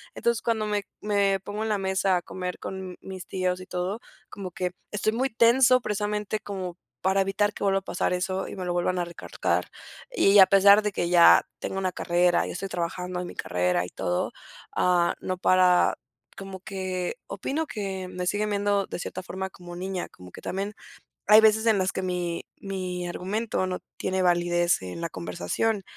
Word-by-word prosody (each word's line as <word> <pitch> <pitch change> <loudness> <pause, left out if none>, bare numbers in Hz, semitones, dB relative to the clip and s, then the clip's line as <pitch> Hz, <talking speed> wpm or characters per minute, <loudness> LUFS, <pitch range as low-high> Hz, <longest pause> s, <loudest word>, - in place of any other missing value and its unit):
Entonces, 235 -1 0
cuando 220 -2 0
me 205 -1 -1 0.2
me 200 -2 +2
pongo 205 +2 -5
en 220 - -2
la 210 - +2
mesa 190 -1 +1
a - - -2
comer 180 -1 -5
con 190 -1 -6
mis 190 -1 -8
tíos 185 -1 -1
y 185 - -10
todo, 185 +5 -3 0.3
como 190 -2 -6
que 180 +1 -2 0.2
estoy 215 +1 0
muy 260 +3 0
tenso, 245 +2 +5
precisamente, 210 0 -2
como 185 -3 -6 0.2
para 190 +1 +2
evitar 205 +2 +1
que - - -6
vuelva 195 -1 +3
a - - -18
pasar 180 - -1
eso 185 +1 -1
y - - -7
me 185 - -4
lo 175 - -1
vuelvan 180 +1 0
a 175 - 0
recalcar. 170 0 -2 0.4
Y 205 - +5
a 190 - +11
pesar 200 +2 +7
de 210 -1 -1
que 175 - -1
ya 175 -1 +7
tengo 190 - -4
una 185 -1 0
carrera 175 0 +2
y - - -5
estoy 195 +2 -4
trabajando 180 +1 -3
en 180 - -5
mi - - -9
carrera 90 0 0
y - - -8
todo, 90 0 -2 0.4
ah, 175 -1 +3
no 185 0 -2
para. 185 -1 +4 0.4
Como 195 -1 -7
que 185 -3 -3
opino 280 +11 -2
que 190 -3 -4
me 180 -1 -4
siguen 210 +2 0
viendo 200 -1 +1
de - - -5
cierta 180 - -5
forma 190 +1 -5
como 175 -1 -11
niña, 185 0 -3
como 90 -1 -14
que - - -11
también 200 +3 -3 0.5
hay 215 +1 +9
veces 220 +1 +4
en 215 -2 +5
las 190 0 +1
que 190 - -3
mi 175 -2 -2
mi 185 -2 -4
argumento 200 +3 -2
no 185 - -3 0.2
tiene 190 0 -1
validez 175 - +2
en 90 - -6
la 170 - -2
conversación. 90 - -2
190 Hz, 195 wpm, -26 LUFS, 180-205 Hz, 0.5 s, a